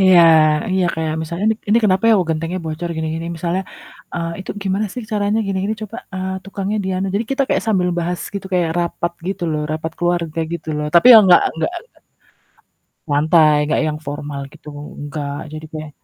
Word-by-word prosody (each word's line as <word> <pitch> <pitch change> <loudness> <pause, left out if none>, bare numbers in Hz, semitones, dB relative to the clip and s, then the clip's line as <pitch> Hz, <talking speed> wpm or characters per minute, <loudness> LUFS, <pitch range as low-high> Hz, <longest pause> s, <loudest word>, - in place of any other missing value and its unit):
Iya, 185 -2 +7 0.5
iya 190 -1 +2
kayak 160 -1 -2
misalnya 170 +5 -4
"Ini 220 - +2
ini 225 - +6
kenapa 190 0 +2
ya?" - - +7
"oh, 185 - +1
gentengnya 165 +3 -2
bocor 160 +2 -4
gini-gini." 160 +1 -3
Misalnya, 175 +3 -1 0.5
eee, 170 -1 -2
"Itu 190 - -7
gimana 195 +2 0
sih 250 - -5
caranya 205 +1 +1
gini 195 -1 -2
gini 215 - -1
coba, 215 +1 -7 0.2
eee, 190 0 -3
tukangnya 200 +1 -3
di - - -2
anu." 190 +1 -1
Jadi 210 +3 0
kita 275 +1 +1
kayak - - +1
sambil 185 -4 +2
bahas 175 +1 -2
gitu 200 -1 -4
kayak 175 -3 +2
rapat 170 0 -2 0.2
gitu 195 - -4
loh, 150 - -1
rapat 160 +1 -4
keluarga 175 -2 0
gitu 170 -2 -5
loh, 150 0 -2
tapi 170 - +6
yang 220 -2 +10
enggak 175 - +7
enggak 160 - -2 1.1
enggak - - -36
lantai, 155 +1 +5
enggak 150 - +1
yang 150 -1 -2
formal 145 0 -5
gitu - - -14 0.3
enggak. 145 -1 -4 0.2
Jadi 155 0 -7
kayak 155 -1 -6
175 Hz, 195 wpm, -19 LUFS, 155-190 Hz, 1.1 s, yang